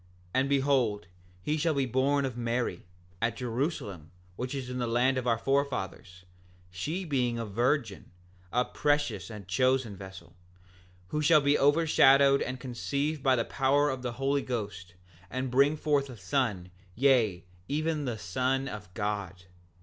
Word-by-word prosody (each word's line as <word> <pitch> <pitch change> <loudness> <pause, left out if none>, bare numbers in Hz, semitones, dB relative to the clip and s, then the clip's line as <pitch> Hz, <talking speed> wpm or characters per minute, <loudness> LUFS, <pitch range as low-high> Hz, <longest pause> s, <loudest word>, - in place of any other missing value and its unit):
7:10 90 - -29 0.3
And 135 +1 +2
behold, 135 -8 +1 0.4
he 150 +8 0
shall 160 0 +1
be 140 -1 +1
born 135 +3 +1
of 130 -3 -4
Mary, 120 -6 -2 0.3
at 115 0 0
Jerusalem 115 - -3 0.3
which 125 +6 -4
is 135 -2 -4
the 125 -1 -3
land 125 +3 +2
of 125 - -5
our 115 -1 +3
forefathers, 115 -8 -2 0.5
she 155 - -3
being 125 -6 0
a 115 - -3
virgin, 120 +1 -1 0.4
a 125 +1 +2
precious 145 -3 0
and 105 -4 -9
chosen 130 +2 +1
vessel, 95 -2 -11 0.7
who 150 - -1
shall 155 +1 +5
be 145 +1 +3
overshadowed 140 -2 +5
and 130 0 -3
conceive 140 +4 -2
by 130 -1 +4
the 115 - 0
power 145 +2 +2
of 130 -1 -5
the 125 -1 -3
Holy 135 +3 0
Ghost, 100 -9 -5 0.3
and 130 +2 -3
bring 140 +4 +4
forth 145 -2 +1
a 125 - -9
son, 95 -4 -1 0.2
yea, 115 -9 +3 0.2
even 155 +1 -1
the 120 -4 -3
Son 130 +8 -1
of 105 -6 -8
God. 100 -4 -3
130 Hz, 155 wpm, -29 LUFS, 110-140 Hz, 0.7 s, shall